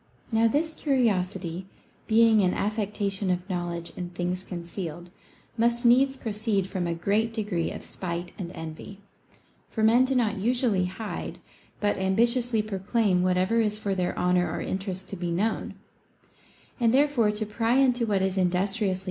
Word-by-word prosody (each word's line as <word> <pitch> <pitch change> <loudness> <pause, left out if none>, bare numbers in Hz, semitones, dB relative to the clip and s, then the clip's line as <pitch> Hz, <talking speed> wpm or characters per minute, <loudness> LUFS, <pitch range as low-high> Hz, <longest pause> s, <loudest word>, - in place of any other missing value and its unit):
Now 225 0 +4
this 315 +7 0
curiosity, 190 - 0 0.4
being 225 -1 +5
an 185 -2 +2
affectation 205 -2 -1
of 180 0 -1
knowledge 175 -2 -3
in 180 -1 -5
things 180 +1 -3
concealed, 175 -1 -6 0.5
must 235 +1 +2
needs 265 +3 +5
proceed 215 -4 -1
from 185 -2 -3
a 170 - -1
great 205 +6 +1
degree 205 -7 -1
of - - -7
spite 175 -1 -5
and 175 -3 -5
envy. 160 +5 -8 0.7
For 220 - -2
men 235 +4 +5
do 265 0 0
not 225 -4 +1
usually 230 -3 +1
hide, 205 +4 -5 0.4
but 205 -1 +1
am 190 0 0
bitiously 235 -1 +2
proclaim 200 -1 +1
whatever 185 +5 +2
is 210 -1 0
for 205 -2 -2
their 180 -2 -1
honor 180 0 +2
or - - -3
interest 190 -1 -3
to - - -5
be 175 -1 -3
known; 200 +7 -1 1.0
and 230 -2 +3
therefore 275 -6 +3
to 215 +1 -2
pry 225 +3 0
into 250 -3 +3
what 195 -3 +1
is 190 0 0
industriously 180 -1 +3
INTO 180 - 0
THINGS 195 +3 0
IMPERTINENT. 190 -4 0
200 Hz, 165 wpm, -27 LUFS, 180-230 Hz, 1.0 s, being